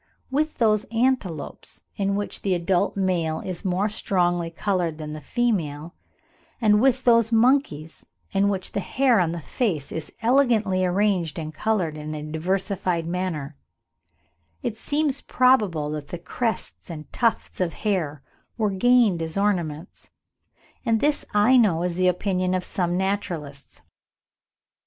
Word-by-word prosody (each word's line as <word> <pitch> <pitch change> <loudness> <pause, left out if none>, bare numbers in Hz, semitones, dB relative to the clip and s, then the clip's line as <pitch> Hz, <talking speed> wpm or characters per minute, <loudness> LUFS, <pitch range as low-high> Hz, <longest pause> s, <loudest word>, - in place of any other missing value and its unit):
With 305 +3 0
those 215 -3 +3
antelopes 225 - -2
in 200 0 0
which 205 0 -3
the 190 -2 +1
adult 175 +3 0
male 170 -5 0
is 185 -2 -5
more 190 +2 +1
strongly 175 -5 0
coloured 175 -2 -1
than 150 -1 -6
the 155 - -7
female, 170 - -1 0.7
and 210 -3 +4
with 260 0 +3
those 230 -2 +4
monkeys 225 - +2 0.3
in 200 +1 +2
which 190 -2 -2
the - - -2
hair 250 +2 +2
on 170 -3 +1
the 170 - -4
face 165 - -2
is 160 -2 -5
elegantly 225 -7 +3
arranged 185 -3 +1
and 155 -1 -5
coloured 180 -4 -1
in 155 0 -5
a 150 - -5
diversified 175 +2 -1
manner, 165 -5 -3 1.1
it 220 - -2
seems 285 +3 -1
probable 210 - +2
that 150 -1 -5
the 175 - -5
crests 220 +6 -4
and 155 -2 -9
tufts 230 -5 0
of 175 -2 0
hair 160 -9 -2 0.3
were 215 -3 +1
gained 220 -3 +3
as 160 +2 -4
ornaments; 175 -5 -2 0.7
and 225 -2 +2
this 295 +3 +1
I 215 +5 +5
know 185 -8 +3
is 180 -1 -1
the 185 +1 +2
opinion 185 0 0
of 185 - -1
some 175 -1 -1
naturalists. 175 -8 -4
185 Hz, 140 wpm, -24 LUFS, 165-220 Hz, 1.1 s, I